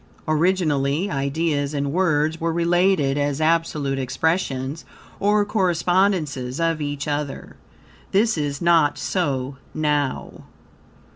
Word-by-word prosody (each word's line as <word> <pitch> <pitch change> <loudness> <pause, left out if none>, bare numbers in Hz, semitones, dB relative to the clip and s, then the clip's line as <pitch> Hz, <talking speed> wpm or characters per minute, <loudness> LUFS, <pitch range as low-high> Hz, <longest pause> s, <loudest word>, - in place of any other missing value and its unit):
Originally, 155 0 +1
ideas 145 +1 -1
and 140 0 -1
words 160 -3 +1
were 165 0 0
related 170 -4 +2
as 145 0 -1
absolute 155 -4 0
expressions 135 +1 -1 0.4
or 205 +1 +2
correspondences, 175 - 0
of 165 -2 0
each 145 0 -3
other. 145 -2 -4 0.6
This 220 +3 +3
is 145 0 -3
not 165 -4 +4
so 140 -7 -2 0.2
now. 150 -3 -2
155 Hz, 100 wpm, -22 LUFS, 140-175 Hz, 0.6 s, not